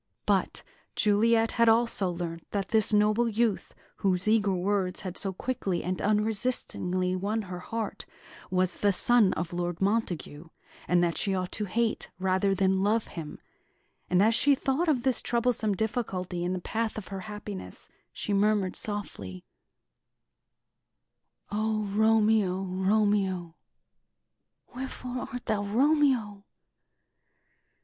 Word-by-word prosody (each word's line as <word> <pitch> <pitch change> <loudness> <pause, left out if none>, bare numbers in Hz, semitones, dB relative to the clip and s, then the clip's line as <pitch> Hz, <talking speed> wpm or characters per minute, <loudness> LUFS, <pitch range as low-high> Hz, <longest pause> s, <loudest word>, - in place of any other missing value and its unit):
But - - 0 0.3
Juliet 225 +2 +3
had 230 -1 +4
also 225 -4 +2
learnt 170 -1 -5
that 200 -2 -3
this 220 -2 +3
noble 215 +3 +3
youth, 225 -1 -1 0.2
whose 185 0 +1
eager 210 -3 +3
words 185 0 -1
had 185 -2 -6
so 195 - +2
quickly 190 -3 -2
and 185 +1 -2
unresistingly 205 -4 0
won 210 +4 -1
her 180 -2 -7
heart, 225 +3 -5 0.4
was 185 -1 0
the 205 - +3
son 225 -1 +4
of 175 0 -4
Lord 175 -1 -2
Montague, 175 -7 -2 0.4
and 175 0 +3
that 170 -1 0
she 195 -1 +1
ought 185 -1 -3
to 210 - -3
hate, 225 +3 -1
rather 190 +1 +1
than 190 0 +2
love 215 +3 +1
him; 160 -3 -7 0.7
and 180 +2 +4
as 225 +2 +4
she 280 +4 +4
thought 275 +6 0
of 255 -6 +1
this 260 -2 +2
troublesome 235 -3 +1
difficulty 190 -5 -2
in 180 +1 -1
the 185 - -2
path 225 +4 -2
of 215 - -7
her 195 -1 -5
happiness, 210 -2 -7 0.2
she 205 - -3
murmured 200 -2 +2
softly: 100 - -4 2.1
"O 215 +1 0
Romeo, 210 -2 +2
Romeo! 190 -2 +1 1.2
wherefore 255 -1 -5
art 250 -1 -6
thou 215 -3 0
Romeo? 240 -3 +2
205 Hz, 130 wpm, -28 LUFS, 185-225 Hz, 2.1 s, had